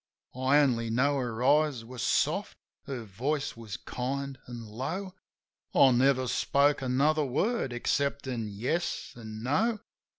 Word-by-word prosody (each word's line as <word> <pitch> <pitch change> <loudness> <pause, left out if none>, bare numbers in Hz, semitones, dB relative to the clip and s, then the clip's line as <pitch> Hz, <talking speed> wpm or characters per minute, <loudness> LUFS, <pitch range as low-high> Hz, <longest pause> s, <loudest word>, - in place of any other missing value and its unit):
I 130 +3 +3
only 120 -6 +2
know 140 +5 +2
her 120 -2 -3
eyes 145 -3 +3
were 125 +1 -9
soft, - - 0 0.3
her 130 -4 -5
voice 135 +9 -2
was 115 -3 -7
kind 135 +1 -4
an' 120 -2 -7
low. 160 - -4 0.6
I 135 - +7
never 130 +1 +3
spoke 140 +3 +2
another 140 +4 +2
word 145 - 0
exceptin' 130 -2 -1
"Yes" 125 - -2
an' 110 -2 -8
"No." 215 - +1
130 Hz, 130 wpm, -29 LUFS, 120-145 Hz, 0.6 s, I